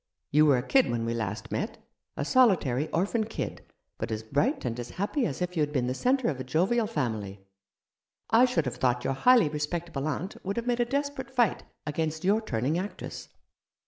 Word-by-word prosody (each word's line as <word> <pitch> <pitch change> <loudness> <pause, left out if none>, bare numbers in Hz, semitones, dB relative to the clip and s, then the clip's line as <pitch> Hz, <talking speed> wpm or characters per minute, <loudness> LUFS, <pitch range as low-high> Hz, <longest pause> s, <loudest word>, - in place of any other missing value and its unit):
You 150 +2 +5
were 140 -3 +5
a 125 - -1
kid 265 -2 +4
when 115 -1 -1
we 115 - -1
last 115 -2 -4
met; - - -2 0.4
a 140 - -1
solitary 160 - +3
orphan 205 +6 0
kid, 220 - -5 0.4
but - - -3
as 110 0 -3
bright 145 - 0
and 120 0 -2
as 120 - -5
happy 210 +8 -1
as 145 +6 -3
if 180 0 -4
you 160 - +1
had 150 0 +1
been 130 -4 0
the 125 - -1
centre 255 - +1
of 140 -5 -1
a - - -3
jovial 190 - +1
family. 105 - -3 0.9
I 230 +3 +7
should 250 0 0
have 125 -2 -3
thought 125 -1 +1
your 135 - 0
highly 235 - +5
respectable 150 0 -3
aunt 160 +5 -4
would 195 +3 -3
have 235 - -1
made 245 -1 0
a 240 - +3
desperate 280 +1 -2
fight 245 -5 +1 0.2
against 155 +1 -2
your 205 +4 +3
turning 135 - -1
actress." 200 +3 -6
160 Hz, 205 wpm, -28 LUFS, -, 0.9 s, I